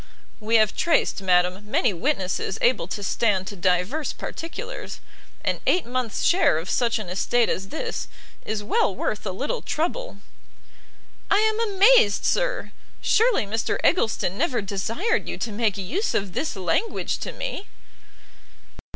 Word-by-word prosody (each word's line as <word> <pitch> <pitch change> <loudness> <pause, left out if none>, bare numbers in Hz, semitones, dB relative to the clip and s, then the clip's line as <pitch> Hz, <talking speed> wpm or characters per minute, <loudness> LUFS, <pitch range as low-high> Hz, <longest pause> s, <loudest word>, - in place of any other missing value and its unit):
"We 220 +1 0
have 215 -2 +4
traced, 335 - +1
madam, 185 +2 +1
many 225 -1 +2
witnesses 190 - -1
able 240 -8 +2
to 200 +2 -5
stand 195 -1 +1
to 205 - -7
divers 185 - 0
particulars; 465 +10 -6 0.5
and - - 0
eight 360 - +3
months 245 -2 -2
share 350 - +4
of 165 +3 -3
such 240 -1 +1
an 215 -4 -5
estate 225 +6 +1
as 190 +1 -2
this, 460 - -4 0.4
is 210 -1 -3
well 205 -2 +1
worth 210 +2 -3
a - - -1
little 280 - -3
trouble." 315 - -3 1.1
"I 400 - +4
am 435 +1 +2 0.2
amazed, 395 - +5
sir! - - 0 0.3
surely 450 - +3
Mr 225 +3 -1
Eggleston 220 - +1
never 275 -6 +1
desired 225 - -1
you - - -4
to 230 - -3
make 210 -1 0
use 300 - -2
of 195 -3 -1
this 310 - -2
language 190 - -1
to - - -4
me?" - - -5
225 Hz, 145 wpm, -24 LUFS, -, 1.1 s, amazed